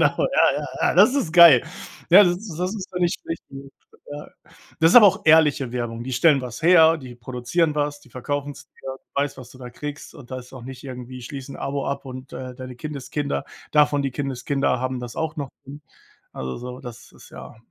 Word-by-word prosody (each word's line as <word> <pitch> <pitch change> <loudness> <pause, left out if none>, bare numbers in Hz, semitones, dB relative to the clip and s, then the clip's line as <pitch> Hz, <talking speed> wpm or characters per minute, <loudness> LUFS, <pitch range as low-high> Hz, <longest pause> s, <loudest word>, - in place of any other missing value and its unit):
genau. - - +5 0.3
Ja, - - +5
ja, - - -4 0.2
ja, - - +2
das 260 - +6
ist 225 - -1
geil. 165 -7 +8 0.5
Ja, 190 +4 +9
das 175 -1 +1
ist 185 -4 -9
das 180 +3 -2
ist 195 -4 -6
für 180 - -4
mich 175 -1 +1
recht 165 - -5
gut, 135 0 -11 0.4
ja. 145 0 -8 0.5
Das 165 +1 +5
ist - - +7
aber 225 -4 +10
auch 195 +1 +2
ehrliche 150 -5 +4
Werbung. 120 -2 -4
Die 130 - -5
stellen 140 +3 +4
was 125 +4 -8
her, 165 -1 +6
die 130 -4 -10
produzieren 125 +7 -1
was, 145 -1 -2
die 125 - -21
verkaufen's 145 +3 -5
dir, 135 0 -9
du 140 - -5
weißt, 145 -1 -5
was 125 -2 -11
du 130 - -15
da 125 -1 -9
kriegst, 145 +4 -8
und 130 -4 -14
da 130 - -4
ist 125 +1 -13
auch 130 - -10
nicht 130 +3 -10
irgendwie: 125 -1 -8
„Schließe 135 +2 -8
'n - - -9
Abo 140 0 -3
ab 140 +1 -4
und, 130 0 -9
äh, 130 -1 -7
deine 130 0 -9
Kindeskinder, 145 +1 -4 0.3
davon 145 -1 +3
die 135 - -1
Kindeskinder 135 -1 -1
haben 130 0 -3
das 120 -1 -8
auch 160 -1 -2
noch 140 -2 -5
drin.“ 140 +2 -10 0.5
Also 65 -1 -5
so, 125 +1 -8
das 120 -3 -11
ist - - -17
ja, - - -11
140 Hz, 225 wpm, -23 LUFS, 125-155 Hz, 0.5 s, aber